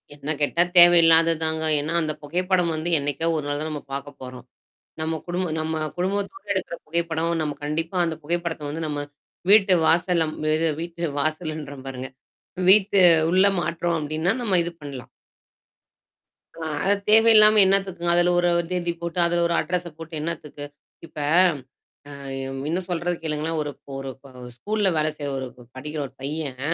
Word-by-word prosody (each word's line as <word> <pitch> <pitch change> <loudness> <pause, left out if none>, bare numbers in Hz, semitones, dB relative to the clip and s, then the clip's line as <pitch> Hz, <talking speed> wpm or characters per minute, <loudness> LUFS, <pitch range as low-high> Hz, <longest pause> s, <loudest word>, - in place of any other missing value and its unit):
என்ன 150 +1 -4
கேட்டா 155 +4 +2 0.2
தேவையில்லாதது 165 -1 +7
தாங்க. 160 0 -1 0.2
ஏன்னா 155 +3 -3
அந்த 155 -1 -2
புகைப்படம் 180 +2 0
வந்து 155 +2 -3
என்னைக்கா 145 +3 -2
ஒரு 150 - -2
நாள் 145 0 -2
தான் 155 - -3
நம்ம 150 - -5
பாக்க 140 +1 -5
போறோம். 125 -1 -9 0.6
நம்ம 160 +1 -2
குடும்ப 180 +1 -2
நம்ம 160 0 -3 0.2
குடும்பத்தோடு 200 - -3
எடுக்கிற 180 -2 -3
புகைப்படம் 165 0 -1
நம்ம 145 -2 -3
கண்டிப்பா 165 +4 -3
அந்த 160 -2 -3
புகைப்படத்த 170 -1 -3
வந்து, 160 +2 -4
நம்ம 145 -1 -3 0.5
வீட்டு 205 -2 +6
வாசல்ல 170 0 +2
ம். - - -9 0.2
இது 165 0 +1
வீட்டு 170 0 -7 0.2
வாசல்ன்ற 155 -1 -3
பாருங்க. 130 0 -6 0.6
வீட்டு 200 0 +5 0.3
உள்ள 190 +2 +4
மாற்றோம் 170 +1 -1
அப்டின்னா, 155 +5 -1
நம்ம 195 -6 +1
இது 170 - -4
பண்ணலாம். 135 -4 -9 1.5
அ, - - -9 0.2
அது 200 +1 +4
தேவையில்லாம 215 -1 +7
என்னத்துக்குங்க? 190 -3 +1
அதுல 175 0 +3
ஒரு 175 - +2
ஒரு 170 - -3
தேதி 175 -1 -1
போட்டு, 170 +1 -3
அதுல 170 0 +1
ஒரு 170 - -1
அட்ரஸ்ச 180 -1 -3
போட்டு 165 0 -10
என்னத்துக்கு 150 -3 -6 0.4
இப்ப. 155 - -11 1.0
அ - - -10 0.4
இன்னும் 180 +2 -3
சொல்றது 175 +1 -1
கேளுங்களான், 155 +1 -2
ஒரு 145 - -4 0.3
ஒரு 135 0 -6
க - - -12 0.3
ஸ்கூல்ல 205 - 0
வேலை 155 0 +1
செய்ற 145 -1 -4
ஒரு 130 - -5 0.3
படிக்கிற 150 +3 -6
ஒரு 135 - -16
பையன். 140 -2 -5
165 Hz, 155 wpm, -23 LUFS, 150-175 Hz, 1.5 s, தேவையில்லாதது